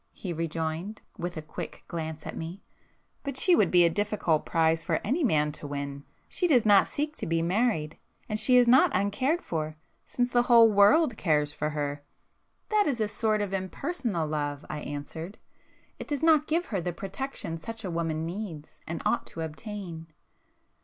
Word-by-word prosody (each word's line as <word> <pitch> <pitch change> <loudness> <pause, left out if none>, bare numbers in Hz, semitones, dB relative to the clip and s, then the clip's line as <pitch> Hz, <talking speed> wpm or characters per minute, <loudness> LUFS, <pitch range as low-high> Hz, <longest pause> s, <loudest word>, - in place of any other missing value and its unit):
he 180 -3 -5
rejoined, 165 +5 -3 0.2
with 175 -1 -4
a 155 - -5
quick 155 - -7
glance 160 -2 -5
at - - -6
me—"But 195 - -9
she 360 +4 +5
would - - +3
be 175 -1 +6
a - - +4
difficult 205 -5 0
prize 160 0 +2
for - - 0
any 280 - 0
man 150 - +2
to 150 0 -7
win. 140 0 -5 0.2
She 360 - 0
does 250 -9 +4
not 205 -2 +6
seek 300 +1 -3
to - - -4
be 165 0 +1
married,—and 205 +2 -2
she 250 +3 +5
is 245 -1 +5
not 265 +9 +6
uncared 205 - +1
for, 155 -1 -3 0.3
since 245 0 -1
the 240 - +4
whole 235 -2 +6
world 225 +5 +5
cares 150 -3 +1
for 150 - -2
her." 145 -1 -3 0.7
"That 425 -1 +3
is 260 -5 0
a 215 - +1
sort 215 0 0
of 195 -1 -5
impersonal 195 - -2
love;"—I 150 0 -3
answered—"It 155 +6 -9
does 290 +1 -2
not 310 -2 +5
give 335 +3 +1
her 190 - 0
the 175 +1 -3
protection 195 -2 -5
such 225 +5 -7
a 185 - -3
woman 165 -1 -2
needs, 170 -4 -7
and 165 0 -4
ought - - +1
to 165 - -7
obtain." 165 0 -6
185 Hz, 175 wpm, -28 LUFS, 160-235 Hz, 0.7 s, be